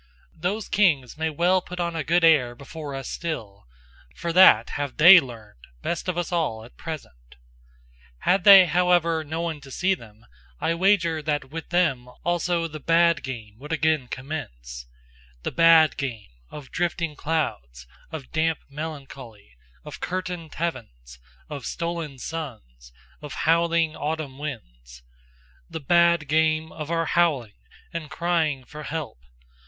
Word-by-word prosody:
Those 185 +6 -3
kings 155 - +2
may 160 +1 -1
well 175 +4 +2
put 180 0 -9
on 170 -1 -2
a 160 - -2
good 170 +3 +2
air 135 -7 +4
before 145 +2 -8
us 135 -1 -6
still: 105 - -6 0.5
for 170 -1 -4
that 165 - +7
have 145 -2 -4
THEY 175 +4 +10
learned 115 - -10 0.2
best 175 - -2
of 175 - -2
us 175 +1 -2
all 145 -11 -1
at 120 - -17
present! - - -9 0.9
Had 185 0 +2
they 195 -2 +10
however 175 -2 +2
no 160 +2 -4
one 165 -3 -4
to 135 - -13
see 185 +8 +1
them, 110 - -11 0.3
I 165 - 0
wager 170 -3 +2
that 145 -3 -2
with 160 0 -7
them 150 -9 +1 0.2
also 175 -1 0
the 155 -1 -8
bad 165 0 +3
game 115 -5 -8
would 150 +3 -9
again 155 -4 +1
commence, 60 - -7 0.6
The - - -2
bad 165 -2 +5
game 120 -7 -5 0.2
of 145 -3 -11
drifting 170 -2 -2
clouds, 100 - -3 0.3
of 150 -5 -8
damp 160 0 +1
melancholy, 135 - -9 0.3
of - - -9
curtained 180 -3 -5
heavens, 60 - -5 0.3
of 145 -3 -7
stolen 170 -4 -4
suns, 110 - -8 0.3
of 150 - -8
howling 165 -1 +2
autumn 150 -3 -4
winds, - - -9 0.7
The - - -5
bad 170 +1 +3
game 155 +1 +1
of 155 -1 -7
our 165 0 0
howling 150 -11 +1 0.4
and 165 -3 -5
crying 160 -6 0
for 150 +4 -10
help! 150 - -5
155 Hz, 145 wpm, -24 LUFS, 130-170 Hz, 0.9 s, THEY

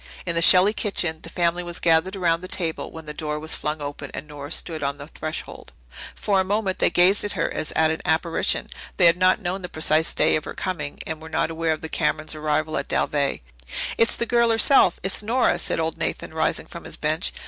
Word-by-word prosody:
In 170 - 0
the 170 - +1
Shelley 185 +4 +7
kitchen 175 -7 0
the 165 - -8
family 175 0 0
was 175 -1 -5
gathered 170 +3 +2
around 170 -3 +1
the 185 - -7
table, 165 -3 -3
when 160 -1 -10
the 150 - -7
door 150 -1 -3
was 160 +1 -4
flung 150 0 -3
open 145 -1 -6
and 150 - -7
Nora 145 -1 -9
stood 160 -3 -2
on 140 0 -2
the 140 - -9
threshold. 155 0 -7 0.4
For 200 -2 +1
a - - +3
moment 195 0 -1
they - - +4
gazed 185 +3 +4
at 205 - -3
her - - -1
as - - -2
at 160 0 +3
an 160 - -3
apparition. 165 +1 +1 0.3
They 180 - +5
had 170 0 +7
not 185 +1 +2
known 185 +2 -2
the 180 - -6
precise 155 -1 +2
day 155 - +3
of 155 - -2
her - - -7
coming 160 -7 -4
and 160 -1 -5
were 160 - -9
not 160 - 0
aware 165 0 -1
of 155 - -2
the 160 - -5
Camerons' 155 0 -1
arrival 155 0 -1
at - - -3
Dalveigh. 140 -2 0 0.5
"It's 230 - +3
the 235 - -1
girl 235 0 +3
herself. 225 -4 +5
It's 190 +3 -1
Nora," 235 +4 +1
said - - -1
old 160 0 -1
Nathan, - - -3
rising - - -1
from - - -10
his - - -7
bench. - - 0
165 Hz, 230 wpm, -23 LUFS, 155-185 Hz, 0.5 s, Shelley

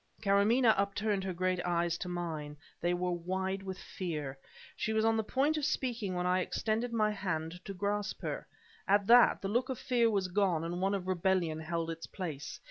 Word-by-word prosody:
Karamaneh 220 +4 +5
upturned 200 0 0
her 190 - -2
great 185 0 0
eyes 170 -1 +1
to 180 - -4
mine. 160 -4 -4 0.2
They 175 - +1
were 180 0 -1
wide 190 +2 -2
with 190 -1 -5
fear. 155 -9 -4 0.4
She 220 - -1
was 220 0 +2
on 225 0 +4
the 220 - +1
point 280 +8 +1
of 305 - -2
speaking 240 -9 -1
when 180 0 -1
I 180 +1 +3
extended 225 +5 -1
my 215 -2 +2
hand 180 -3 -3
to 195 - -5
grasp 205 +2 -2
her. - - -4 0.4
At 200 0 +4
that, 240 0 +6
the - - 0
look 245 +6 0
of 260 - -2
fear 240 -3 +2
was 200 -4 +1
gone 180 -3 +1
and 175 +2 -3
one 195 +1 +2
of 190 -2 -4
rebellion 180 -3 +1
held 165 0 -2
its 165 0 -7
place. 160 -7 -6
190 Hz, 200 wpm, -32 LUFS, 175-215 Hz, 0.4 s, that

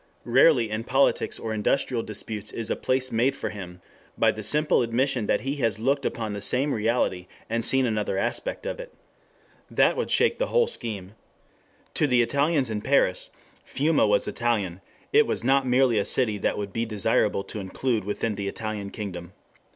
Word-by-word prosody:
Rarely 120 -2 +4
in 110 +1 -2
politics 135 +3 +2
or 110 - -4
industrial 115 +3 0
disputes 110 -1 -6
is 115 -1 -4
a - - +1
place 130 0 0
made 120 +4 +2
for - - -4
him 90 -3 -9 0.4
by - - +4
the 110 - -7
simple 150 +8 +2
admission 120 0 0
that - - +1
he 140 +2 -3
has 115 -7 0
looked 135 +5 +1
upon 110 -3 -4
the 100 - -5
same 135 +7 +1
reality 105 -5 0 0.2
and 115 0 0
seen 135 +2 +3
another 105 -4 -1
aspect - - -2
of - - -4
it. - - -9 0.7
That - - +3
would 475 - -2
shake 465 0 +2
the - - +1
whole 480 -1 +3
scheme. 105 - -5
Thus 105 - -31
to 150 - +2
the 125 -3 +4
Italians 140 0 +1
in 105 -1 -2
Paris 130 -7 +2 0.3
Fiume 145 -5 +1
was 100 -1 +2
Italian 100 -7 -1 0.3
It - - +5
was - - -2
not 135 +1 +3
merely 125 -3 +3
a 100 - 0
city 110 -5 +1
that - - +1
it - - -8
would 100 -1 -5
be 115 - -1
desirable 100 -2 +1
to 105 - -7
include 110 +3 -1
within 105 +2 -2
the 100 -1 -4
Italian 105 -1 -4
kingdom. 95 -4 -7
115 Hz, 190 wpm, -25 LUFS, 105-135 Hz, 0.7 s, It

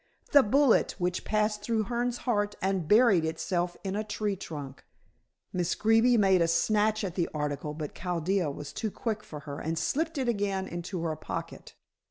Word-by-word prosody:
The 285 - +8
bullet 265 +2 +3
which 180 -1 -1
passed 210 0 0
through 220 0 0
Hearne's 240 +2 -2
heart, 205 -4 0
and 190 -4 -1
buried 210 -4 +5
itself 175 +2 -2
in 195 0 -3
a 215 - -1
tree 210 -1 -2
trunk." 145 -7 -8 0.7
Miss 180 -1 0
Greeby 225 +3 +4
made 190 -4 +4
a 165 - +3
snatch 215 +5 +2
at 185 -4 -3
the 175 -2 -1
article, 150 0 -3
but 150 -2 -5
Chaldea 180 0 -1
was 145 0 -7
too 220 - -2
quick 215 0 -3
for 150 -2 -9
her 145 -1 -7
and 160 +1 -3
slipped 320 - -1
it 260 -2 -1
again 200 -4 0
into 175 +1 -5
her 160 -2 -1
pocket. 155 - -7
195 Hz, 180 wpm, -29 LUFS, 165-220 Hz, 0.7 s, The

